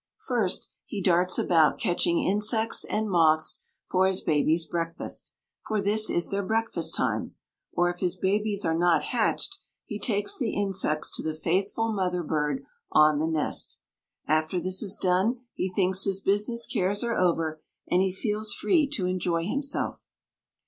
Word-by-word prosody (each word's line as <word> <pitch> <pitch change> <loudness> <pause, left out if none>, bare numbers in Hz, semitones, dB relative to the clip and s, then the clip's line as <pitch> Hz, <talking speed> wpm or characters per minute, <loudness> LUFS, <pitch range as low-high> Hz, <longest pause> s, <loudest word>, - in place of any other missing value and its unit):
First, 225 -7 0 0.2
he 205 - -4
darts 180 -1 +3
about 160 -4 +3
catching 175 -1 +1
insects 215 +3 +1
and 215 +1 -2
moths 160 -4 +2 0.2
for 190 +1 +3
his 190 -1 +1
babies' 160 +2 +2
breakfast 165 -1 -3 0.4
for 215 -1 0
this 215 +2 +3
is 175 - +1
their 200 0 -1
breakfast 200 -6 -1
time - - -1 0.4
or 175 - +2
if 175 - -11
his 180 -2 0
babies 205 +1 0
are 165 - +1
not 170 0 +3
hatched - - -1 0.3
he 210 - -6
takes 205 -1 0
the 240 -5 -1
insects 190 -6 -1
to - - -4
the 155 -1 -3
faithful 195 +7 -1
mother 180 -3 -1
bird 150 -3 -1 0.3
on 155 -1 +5
the 160 - 0
nest. 160 -2 -1 0.5
After 155 +3 +1
this 185 +1 -1
is 205 -1 -2
done 190 +7 +1
he 185 - -2
thinks 185 +1 +2
his 195 -1 0
business 210 +5 +1
cares 195 +3 0
are 235 -1 -1
over, 165 -3 0 0.3
and 180 - +2
he 190 0 +1
feels 210 +2 -2
free 315 -7 +2
to 190 -10 -1
enjoy 175 -2 -1
himself. 280 +7 -3
185 Hz, 160 wpm, -27 LUFS, 165-210 Hz, 0.5 s, on